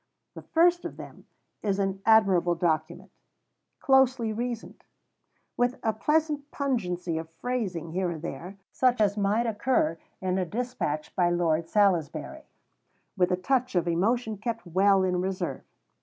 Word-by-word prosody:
The - - -9
first 345 +1 +3
of - - -6
them - - -11 0.3
is 200 -2 0
an 195 -1 -1
admirable 195 -6 +4
document; 165 -1 -1 0.7
closely 260 -4 +3
reasoned; 235 0 -5 0.7
with 245 +2 +1
a 220 - +1
pleasant 300 +3 0
pungency 180 - -2
of 160 0 -8
phrasing 185 -5 -4
here 180 +1 -1
and 165 -2 -6
there, 180 +3 -7
such 250 -2 +2
as 205 -2 +3
might 210 +3 +1
occur 210 -7 0 0.2
in 185 0 -1
a - - +1
despatch 190 -8 -3
by 175 -2 +3
Lord 165 -2 0
Salisbury; 180 -8 0 0.7
with 180 -2 +2
a 180 - +2
touch 255 +4 0
of 175 -1 +1
emotion 220 +6 0
kept 230 0 -4
well 190 +2 +3
in 180 -1 0
reserve. 190 0 -3
195 Hz, 140 wpm, -27 LUFS, 175-240 Hz, 0.7 s, admirable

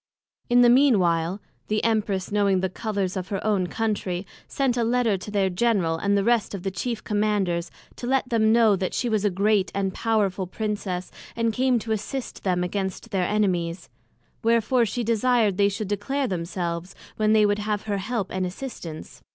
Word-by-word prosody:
In 245 0 +5
the 240 - +6
mean 260 -2 +5
while, 170 +1 0 0.3
the 215 0 0
Empress 210 -4 0
knowing 200 -2 +2
the 190 -1 -1
Colours 200 -2 -2
of 185 -1 -3
her 195 -1 -2
own 200 -4 +1
Country, 200 -4 -2 0.2
sent 270 -3 0
a 240 - +1
Letter 235 -2 +2
to 195 - -8
their 200 -2 +1
General, 185 -3 +1
and 200 +4 +1
the 200 - +1
rest 235 -2 +1
of 185 - -7
the 195 - -2
chief 225 +5 -3
Commanders, 205 -5 0 0.3
to 240 - -5
let 265 0 +1
them 220 -2 +3
know, 225 -3 +5
that 185 -1 -3
she 245 - 0
was 215 -2 +1
a 205 - +3
great 200 +1 +1
and 195 -1 -1
powerful 200 -4 0
Princess, 200 -3 -3 0.2
and 230 -1 0
came 255 +1 +2
to 225 0 -4
assist 225 +5 -4
them 180 -2 +1
against 190 +4 -3
their 190 -3 +1
Enemies: 180 -4 -1 0.5
wherefore 230 +1 +3
she 240 +4 -2
desired 230 -3 +2
they 200 0 +4
should 205 0 -4
declare 270 +7 -1
themselves, 175 -2 -3 0.2
when 215 0 +3
they 215 -1 +5
would 205 0 +1
have 210 -1 -2
her 205 -2 -2
help 210 0 -3
and 185 0 -1
assistance. 180 -5 -7
205 Hz, 190 wpm, -25 LUFS, 185-230 Hz, 0.5 s, the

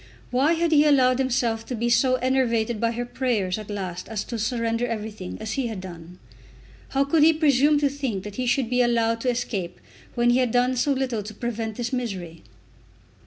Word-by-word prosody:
Why 270 +6 +3
had 335 0 0
he 295 -1 +6
allowed 260 -4 +4
himself 240 -4 0
to 250 - -3
be 235 +1 -1
so 240 +2 +3
enervated 240 -3 0
by 230 0 +1
her 240 +1 -3
prayers 220 -7 -1
at 215 - -9
last 185 -3 -5
as 215 -2 -3
to 235 - -5
surrender 230 +1 -1
everything, 215 -4 -5
as 220 0 -5
he 265 0 -1
had 220 -4 -5
done? 175 -1 -10 0.7
How 275 0 +2
could 295 +3 +2
he 320 +2 +6
presume 295 -1 +3
to 285 - +4
think 265 -9 -3
that 205 0 -8
he 255 -1 -1
should 245 0 +1
be 250 0 +3
allowed 230 -1 +1
to 255 - 0
escape, 225 -7 -3 0.4
when 240 0 +3
he 245 - +3
had 250 -2 +2
done 250 +2 +2
so 255 +4 +1
little 260 -5 -1
to 210 +1 -9
prevent 225 -2 -4
this 240 +2 -4
misery? 190 -10 -4
240 Hz, 205 wpm, -24 LUFS, 220-260 Hz, 0.7 s, he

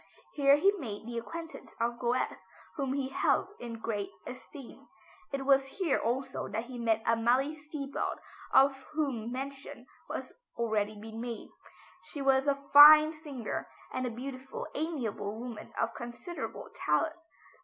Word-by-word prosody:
Here 280 -1 +6
he 390 +7 +5
made 220 -7 -6
the 235 0 -3
acquaintance 330 +7 -8
of 235 +1 0
Goethe 245 +1 0 0.4
whom 275 -3 -1
he 270 -1 -1
held 275 - +2
in 235 -1 -6
great 210 -3 -3 0.2
esteem. 265 +2 -10 0.4
It 275 -1 -3
was 270 -1 +5
here 355 -8 +2
also 255 +4 -2
that 220 +2 -3
he 250 -1 -8
met 225 -1 +1
Amalie 240 +6 +2
Seebald 300 -2 -4 0.3
of 270 +1 +6 0.2
whom 265 -7 -1
mention 270 -1 -6 0.3
has - - -5 0.2
already 215 -2 0
been 220 +1 -7
made. 235 -2 -5 0.6
She 295 - -8
was 270 0 +3
a 280 0 0
fine 305 +2 +11
singer, 290 -7 -5 0.2
and 255 0 -1
a - - -1
beautiful, 260 +2 -6
amiable 245 -10 -3
woman 240 -2 -7
of 230 0 0
considerable 240 +9 -6
talent. 320 +1 +1
260 Hz, 145 wpm, -31 LUFS, 230-280 Hz, 0.6 s, fine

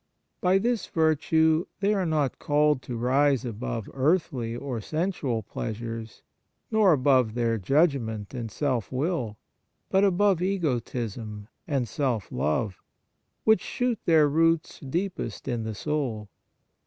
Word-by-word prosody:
By 185 +1 +4
this 235 +3 0
virtue 160 +1 +2
they 205 +1 +2
are 190 -4 0
not 150 -4 0
called 150 -2 +2
to 125 -2 -5
rise 135 +2 +2
above 115 -1 -4
earthly 135 -5 0
or 125 -2 -4
sensual 155 - -2
pleasures, 115 +1 -6 0.5
nor 215 -4 +5
above 130 -6 +3
their 115 -2 +1
judgment 120 - +1
and 120 -3 -4
self 125 -2 -1
will, 130 - -1 0.5
but 190 +1 +4
above 195 -2 +3
egotism 120 - -2 0.2
and 135 -6 0
self 120 -6 -2
love, 95 +6 -1 0.6
which 220 -4 +4
shoot 245 -3 -1
their 160 -3 +5
roots 165 +2 +1
deepest 175 +6 -4
in 120 -3 -2
the 110 -1 -4
soul. 125 -7 -2
140 Hz, 125 wpm, -27 LUFS, 115-165 Hz, 0.6 s, nor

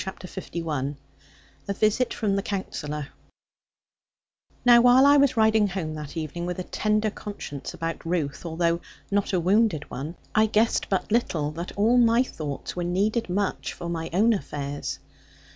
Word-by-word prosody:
CHAPTER 190 -1 -7 0.3
LI 150 -4 -2 0.7
A 200 - 0
VISIT 215 +5 +1
FROM 205 -3 0
THE 195 - +1
COUNSELLOR 150 -8 -4 1.6
Now 240 -1 +8
while 250 +2 +7
I 285 +1 +7
was 275 -3 +3
riding 220 -1 +4
home 180 -5 -3
that 150 +1 -7
evening, 165 +2 -4
with 180 - -3
a 185 - -3
tender 215 +2 0
conscience 175 -9 -7
about 165 -2 -4
Ruth, 165 -5 -2
although 170 0 0 0.3
not 205 0 +1
a 185 - +2
wounded 185 -3 +2
one, 145 +7 -5 0.2
I 215 0 +4
guessed 220 +2 +1
but 195 +1 -1
little 165 -10 +1
that 170 +3 -6
all 230 +5 +4
my 235 +1 +5
thoughts 150 - -6
were 175 - -2
needed 205 +5 0
much 195 +2 -1
for 175 -1 -6
my 165 -1 -3
own 215 +7 +4
affairs. 145 -7 -4
185 Hz, 160 wpm, -25 LUFS, 160-215 Hz, 1.6 s, Now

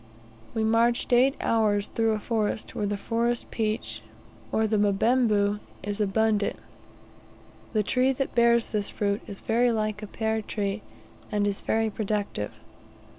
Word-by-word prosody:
We 220 - +1
marched 230 +3 +2
eight 260 +3 +5
hours 210 -3 +2
through 225 0 0
a 215 - -1
forest, 220 -1 -2
where 205 - -1
the 205 0 -1
forest 235 +3 -1
peach, 215 - -2 0.5
or 220 - +2
the 215 0 +1
"mbembu," 210 0 +2 0.2
is 205 +2 -3
abundant. 210 +1 +1 1.2
The 215 -2 +2
tree 255 +5 +2
that 270 +1 -3
bears 235 -1 +3
this 210 -2 0
fruit 200 0 -1
is 200 -2 -6
very 240 +2 +2
like 215 -1 -1
a 210 - -6
pear 220 +1 -1
tree, 205 0 -3 0.5
and 205 -1 +1
is 200 -1 -1
very 220 0 0
productive. 205 - -2
215 Hz, 145 wpm, -27 LUFS, 205-230 Hz, 1.2 s, eight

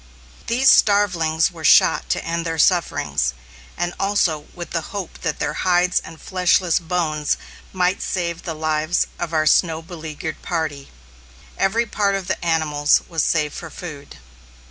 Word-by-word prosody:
These 255 +3 +5
starvelings 175 -6 +3
were 165 -2 -11
shot - - +5
to - - -1
end 170 0 -2
their 165 -1 -3
sufferings, 155 - +1 0.4
and 175 +1 -2
also 185 -7 0
with 175 -2 -7
the 165 - -1 0.2
hope 190 -4 -6
that 165 -4 -2
their - - -2
hides 180 0 +3
and 165 -1 -12
fleshless 180 -2 +2
bones 160 -4 -1 0.3
might 185 +1 0
save 170 -2 -2
the 165 -3 -5
lives 155 +1 0
of 175 -1 -3
our 155 -1 +1
snow 160 0 +3
beleaguered 160 -2 -7
party. 155 -5 -3 0.7
Every 220 +5 +1
part 200 -3 0
of 195 -2 -3
the - - -2
animals 155 -3 +2
was 165 -3 0
saved 150 -3 +1
for 165 - -7
food. 150 -3 -9
170 Hz, 150 wpm, -21 LUFS, 155-180 Hz, 0.7 s, These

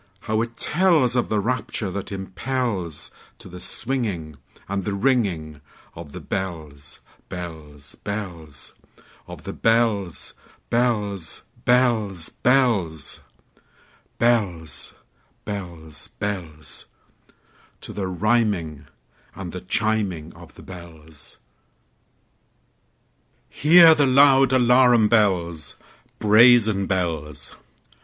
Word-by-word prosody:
how 110 0 0
it 115 0 -4
tellsOf 150 -10 +3
the 110 - +1
rapture 110 -3 -2
that 100 +1 -5
impelsTo 100 - -3 0.4
the 90 - -9
swinging 105 - -2 0.3
and 100 0 -2
the 100 +2 -3
ringingOf 85 - -2
the - - -7
bells, 80 -7 -5 0.3
bells, 80 -5 -8
bells, 90 -8 -6 0.5
Of - - -10
the - - -6
bells, 110 - +1 0.4
bells, 105 -7 0 0.2
bells, 110 -9 +2
bells, 105 - +1 1.0
Bells, 95 -10 0 0.5
bells, 85 -7 -6
bells—To 85 -7 -9
the 95 -2 -3
rhyming 95 -7 0 0.5
and 95 -3 -6
the 90 - -6
chiming 95 -5 -1
of - - -15
the - - -13
bells! 80 -4 -11 2.1
Hear 165 +2 +7
the 145 -3 +3
loud 135 0 +6
alarum 125 -3 +5
bells, 85 -8 +1 0.4
Brazen 110 -2 +5
bells! 80 -6 -2
100 Hz, 85 wpm, -23 LUFS, 85-120 Hz, 2.1 s, Hear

